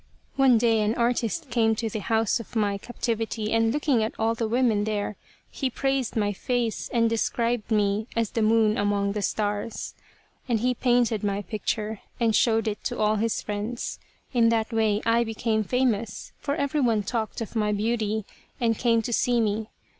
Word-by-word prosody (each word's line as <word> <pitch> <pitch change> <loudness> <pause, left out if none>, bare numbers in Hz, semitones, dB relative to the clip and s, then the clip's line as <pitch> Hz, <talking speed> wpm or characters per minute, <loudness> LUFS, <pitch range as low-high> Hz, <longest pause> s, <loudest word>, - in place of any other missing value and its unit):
One 265 -3 +5
day 225 -1 +3
an 210 +2 +1
artist 240 +4 0
came 225 -1 +3
to 225 +1 -2
the 220 0 -3
house 225 +1 +1
of 230 - -10
my 205 -2 +1
captivity 225 -2 -3
and 225 0 +3
looking 285 -3 +1
at 220 - -2
all 225 +1 +1
the 230 -1 -2
women 230 -3 +2
there, 210 -1 -2 0.4
he 270 - -1
praised 270 -1 -1
my 205 -2 +1
face 240 +1 -2
and 230 -1 +3
described 230 0 0
me 210 0 +1
as 230 -2 0
the 230 - -1
Moon 220 0 +3
among 205 -1 +1
the 210 +1 -2
Stars. 205 +2 -2 0.6
And 225 -3 +1
he 250 +1 +2
painted 240 -4 +2
my 200 0 -1
picture 215 +1 -3 0.2
and 225 -2 +2
showed 225 -2 +3
it 210 -1 -3
to - - -2
all 215 0 +2
his 225 +1 -1
friends. 210 +3 -4 0.3
In 230 -2 +4
that 225 0 0
way 220 -2 +1
I 230 +1 +3
became 220 -1 -1
famous, 230 -2 -1
for 285 -1 -2
everyone 265 -7 +1
talked 220 +2 -3
of 225 0 -6
my 210 -1 +1
beauty 215 0 -1 0.3
and 230 -2 +2
came 230 -2 +3
to 240 - -3
see 245 +1 +2
me. 215 0 0
225 Hz, 180 wpm, -26 LUFS, 215-235 Hz, 0.6 s, One